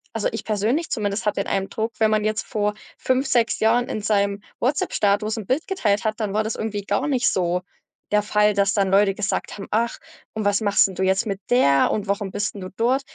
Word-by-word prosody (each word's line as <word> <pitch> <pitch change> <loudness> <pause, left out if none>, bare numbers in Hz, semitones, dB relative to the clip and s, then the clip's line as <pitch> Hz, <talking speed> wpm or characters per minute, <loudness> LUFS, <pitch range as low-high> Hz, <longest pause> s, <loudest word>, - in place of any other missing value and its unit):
also, 225 - 0
ich 225 - -5
persönlich 220 +10 0
zumindest 210 -2 -2
habe 210 -1 +1
den - - -10
Eindruck, 210 +4 -2
wenn 220 -1 +3
man 215 -1 +2
jetzt 215 0 -1
vor 210 -1 -1 0.2
5, 260 +1 +1
6 240 -4 +1
Jahren 240 +3 +2
in 215 - -4
seinem 200 -1 +1 0.2
WhatsApp-Status 215 -5 +1
'n 210 - -6
Bild 275 +5 0
geteilt 210 - 0
hat, 215 +1 -1
dann 205 -2 -2
war 215 +1 +1
das 220 - -2
irgendwie 210 -2 -4
gar 205 +8 -1
nicht 255 -4 +1
so 180 0 0 0.5
der 210 0 +4
Fall, 210 0 +2
dass 200 0 +2
dann 195 -2 +1
Leute 195 0 +4
gesagt 210 0 -3
haben: 195 - -7
„Ach, 230 +2 0 0.4
und 215 -2 -3
was 205 +2 +2
machst 205 -1 +4
'n 190 - -8
du 185 - -5
jetzt 190 +3 +2
mit 200 -3 -3
der?!“ 140 - +4
und: 210 -1 -2
„Warum 200 0 -1
bist 205 +2 -2
'n 200 - -9
du 185 - -6
dort?“ 250 +4 +2
210 Hz, 230 wpm, -23 LUFS, 200-225 Hz, 0.5 s, der